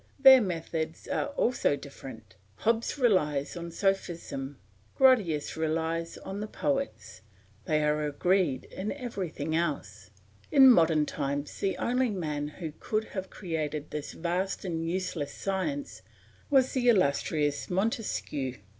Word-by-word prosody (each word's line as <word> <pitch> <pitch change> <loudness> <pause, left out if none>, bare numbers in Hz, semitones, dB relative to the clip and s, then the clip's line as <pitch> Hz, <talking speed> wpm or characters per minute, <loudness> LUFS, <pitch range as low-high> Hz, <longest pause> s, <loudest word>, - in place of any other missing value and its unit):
Their 265 -2 +9
methods 165 -4 -3
are 280 - -1
also 240 - +2
different: 125 -7 -11 0.2
Hobbes 230 - 0
relies 150 - +2
on 170 0 -5
sophism; 170 -7 -2 0.4
Grotius 205 - +3
relies 165 +1 -1
on 195 +1 -6
the 210 - -4
poets; 275 +4 -3 0.4
they 155 -1 +1
are 150 0 +1
agreed 165 -1 +1
in 195 +3 -5
everything 195 - -4
else. 140 - -2 0.4
In 265 -2 +9
modern 160 -7 +4
times 145 0 -3
the 195 - 0
only 250 +1 +1
man 150 -7 -2
who 155 +1 -7
could 215 0 -1
have 190 -1 -4
created 155 -5 -4
this 150 -1 -5
vast 180 +4 -2
and 165 -2 -2
useless 175 -5 -3
science 275 +10 -3 0.5
was 265 -3 +4
the 245 -2 +3
illustrious 145 -6 +1
Montesquieu. 185 - -1
170 Hz, 125 wpm, -29 LUFS, 150-215 Hz, 0.5 s, Their